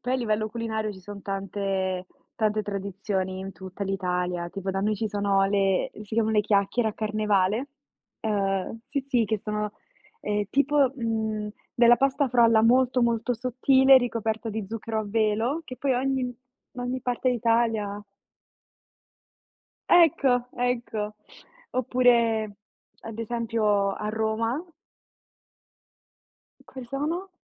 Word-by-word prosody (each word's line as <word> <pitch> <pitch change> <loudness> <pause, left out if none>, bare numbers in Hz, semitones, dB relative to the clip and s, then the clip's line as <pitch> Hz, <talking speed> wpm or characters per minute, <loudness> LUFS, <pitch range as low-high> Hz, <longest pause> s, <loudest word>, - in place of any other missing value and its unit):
Poi 250 - -2
a 260 - +3
livello 215 -3 0
culinario 220 -1 -3
ci 190 - -13
son 200 +1 -9
tante 195 -2 -2 0.3
tante 215 -1 +1
tradizioni 195 -1 -3
in 190 0 -6
tutta 190 +1 -8
l'Italia. 180 -2 -2
Tipo 195 +1 -4
da 195 0 -2
noi 210 +2 +1
ci 215 +2 -2
sono 200 -1 +1
le 195 -1 +1
si 210 - -7
chiamano 220 -1 +2
le 210 - +4
chiacchiere, 210 +3 +1
a - - -11
Carnevale. 215 +2 0 0.5
Ehm, 200 0 -1
sì, 280 0 -1
sì, 245 -4 +3
che 220 +1 -1
sono, 210 0 -3 0.5
ehm, 210 0 -1
tipo, 280 -1 +3
mhmm, 220 -3 -2 0.3
della 240 0 +6
pasta 275 +2 +1
frolla 230 -2 +5
molto, 250 +2 +4
molto 235 +1 +1
sottile 260 +3 +5
ricoperta 225 -2 -2
di 215 0 -3
zucchero 225 0 -3
a - - -4
velo 225 +8 0
che 255 -3 -8
poi 270 -1 0
ogni 255 -1 -1 0.4
ogni 250 +1 -3
parte 250 +1 -1
d'Italia 230 -3 +1
ha. 205 +1 -8 1.8
Ecco, 275 -8 +4
ecco. 235 -4 -2 0.6
Oppure 235 -4 +2 0.4
ad 225 0 -9
esempio 225 -3 0
a 210 +2 -4
Roma 220 +5 -1 2.0
Quali 260 -2 -10
sono? 310 +9 -3
220 Hz, 130 wpm, -26 LUFS, 205-245 Hz, 2.0 s, della